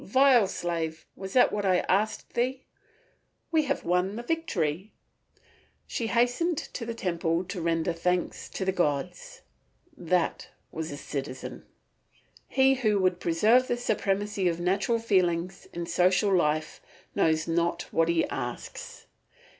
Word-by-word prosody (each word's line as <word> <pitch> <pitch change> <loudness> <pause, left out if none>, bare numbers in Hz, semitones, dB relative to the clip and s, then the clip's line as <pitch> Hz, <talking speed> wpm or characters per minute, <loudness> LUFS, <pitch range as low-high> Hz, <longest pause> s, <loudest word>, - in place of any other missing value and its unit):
"Vile 255 -1 +5
slave, 165 -3 -3
was 190 0 -7
that 255 - +5
what 205 - -1
I 185 -2 +3
asked 210 +3 -1
thee?" 255 +2 -1 0.9
"We 315 -2 +3
have 280 0 -2
won 180 +3 +1
the 235 - -5
victory." 200 - -2 0.9
She 230 - -3
hastened 245 +9 +1
to 230 -5 -6
the 230 - -4
temple 170 -3 -1
to 185 -1 -6
render 165 0 0
thanks 180 +1 -1
to 190 - -4
the 190 - +2
gods. 175 -1 -2 0.5
That 175 - -1 0.2
was 160 0 -4
a 145 - -6
citizen. 135 -2 -6 0.8
He 265 0 +4
who 220 -6 +1
would 185 -2 +1
preserve 215 +10 +3
the 240 - 0
supremacy 205 -4 0
of 170 -1 0
natural 195 +6 +1
feelings 185 -5 0
in 170 0 -4
social 180 +3 +3
life 155 -2 0 0.3
knows 160 0 +2
not 170 +1 0
what 165 0 +2
he 170 -1 +2
asks. 120 0 -6
185 Hz, 140 wpm, -28 LUFS, 170-225 Hz, 0.9 s, Vile